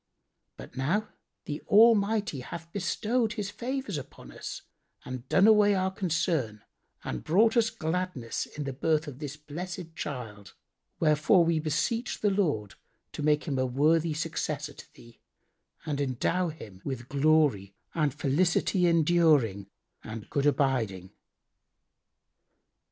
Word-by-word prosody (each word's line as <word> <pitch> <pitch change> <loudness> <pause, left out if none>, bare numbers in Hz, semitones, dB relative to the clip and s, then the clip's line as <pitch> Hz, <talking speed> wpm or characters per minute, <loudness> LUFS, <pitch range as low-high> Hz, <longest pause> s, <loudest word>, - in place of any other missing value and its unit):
But 65 - -11
now 170 +12 0 0.4
the 150 0 -5
Almighty 215 - +4
hath 165 +6 -8
bestowed 220 +4 0
His 210 -3 -4
favours 250 - -3
upon 135 - -12
us - - -7 0.4
and 130 0 -7
done 190 - +5
away 210 -2 +6
our 190 0 0
concern 165 - -1 0.4
and 65 - -4
brought 220 +8 +3
us 230 -2 +4
gladness 160 - -3
in 150 - -6
the 135 -1 -4
birth 155 +3 +1
of 140 -2 -8
this 150 -1 -6
blessed 165 +3 -7
child; 115 -10 -7 0.4
wherefore 155 +3 +4
we 165 -1 +2
beseech 165 - -1
the 205 - +3
Lord 150 - 0 0.4
to - - -6
make 150 0 +2
him 140 -5 -2
a 130 - +2
worthy 155 +5 +2
successor 150 -2 -3
to - - -14
thee 120 -1 -17 0.7
and 145 -3 -2
endow 140 +7 0
him 110 - -9
with 130 -3 -5
glory 140 -9 +2 0.2
and 150 -3 +1
felicity 175 +6 +1
enduring 155 - +3 0.3
and 110 -1 -8
good 140 0 +1
abiding." 115 -11 0
155 Hz, 130 wpm, -28 LUFS, 135-185 Hz, 0.7 s, away